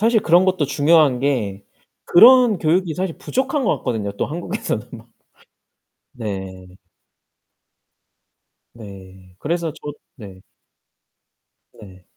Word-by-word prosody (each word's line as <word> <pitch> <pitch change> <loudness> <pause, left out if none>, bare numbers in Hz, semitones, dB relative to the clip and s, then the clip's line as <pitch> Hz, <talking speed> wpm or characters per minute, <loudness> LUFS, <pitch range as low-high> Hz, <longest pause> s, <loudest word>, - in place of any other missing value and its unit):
사실 225 +1 +2
그런 175 0 +3
것도 185 -5 0
중요한 145 -2 +3
게 110 -8 -2 0.4
그런 240 +1 +6
교육이 165 +1 0
사실 180 -1 -4
부족한 270 +2 -2
것 - - 0
같거든요 110 -5 -4
또 100 - -3
한국에서는. 170 +4 -5 1.3
네. 95 -4 -8 2.0
네 95 -4 -14
그래서 165 - -3
저 150 -1 -9 0.2
네. 100 -7 -12 1.3
네. 95 -3 -16
145 Hz, 190 characters per minute, -19 LUFS, -, 2.0 s, 그런